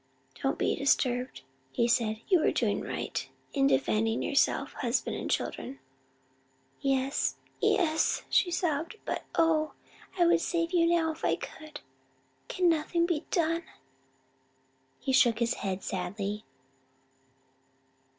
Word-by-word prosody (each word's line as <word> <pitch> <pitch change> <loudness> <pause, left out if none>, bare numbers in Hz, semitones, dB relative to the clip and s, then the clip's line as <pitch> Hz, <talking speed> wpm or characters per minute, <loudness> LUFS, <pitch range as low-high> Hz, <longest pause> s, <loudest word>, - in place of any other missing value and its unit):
"Don't - - 0
be - - +1
disturbed," 255 - 0 0.3
he 235 - +1
said, 225 -2 +1
"you 370 -3 +5
were - - +3
doing - - 0
right - - -4 0.2
in 275 -2 +3
defending 225 -4 +1
yourself, 280 - +1
husband 250 0 -1
and - - -4
children." 270 +2 -2 1.0
"Yes, 270 0 0 0.2
yes," 320 -3 +2
she 365 - +3
sobbed, 335 +1 -1
"but - - -3
oh, 315 -2 +2 0.4
I 350 - +4
would 340 0 +4
save 335 -1 -1
you 335 -1 +4
now 335 -1 +2
if 310 - -11
I - - +3
could! 310 -1 -9 0.7
Can 365 -1 +1
nothing 335 +1 +2
be 335 -3 -2
done?" 330 -2 +1 1.4
He 265 - -1
shook 240 -4 +5
his 235 0 +1
head 190 -1 -3
sadly. 200 +3 -3
285 Hz, 125 wpm, -29 LUFS, 235-335 Hz, 1.4 s, you